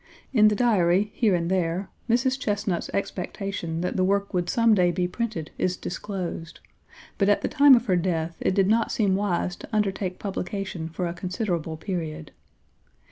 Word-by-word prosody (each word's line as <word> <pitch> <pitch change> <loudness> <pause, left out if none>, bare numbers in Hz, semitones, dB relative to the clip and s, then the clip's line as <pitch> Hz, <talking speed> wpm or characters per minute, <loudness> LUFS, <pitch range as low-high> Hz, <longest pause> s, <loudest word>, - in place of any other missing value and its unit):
In 215 -4 +6
the 210 - +3
Diary, 205 -4 +3
here 215 -6 +2
and 170 -1 -1
there, 185 +1 -1 0.2
Mrs. 260 +3 +2
Chesnut's 205 -7 -1
expectation 190 -3 -3
that 180 - -2
the 185 - +3
work 200 +2 +1
would 175 -1 0
some 230 +1 +4
day 180 -3 +4
be 180 +1 0
printed 180 -5 -4
is 185 0 0
disclosed, 180 -3 -5 0.6
but 200 -1 +3
at 205 - +2
the - - +1
time 285 -2 +7
of 235 0 +1
her 190 -6 +2
death 165 -2 -1
it 185 - 0
did 195 -2 +4
not 225 +2 +2
seem 200 -4 +2
wise 185 -3 -1
to - - -11
undertake 195 -3 -1
publication 190 -4 -4
for 175 +2 -3
a 170 - -2
considerable 175 -3 -3
period. 160 -3 -5
190 Hz, 175 wpm, -25 LUFS, 175-210 Hz, 0.6 s, time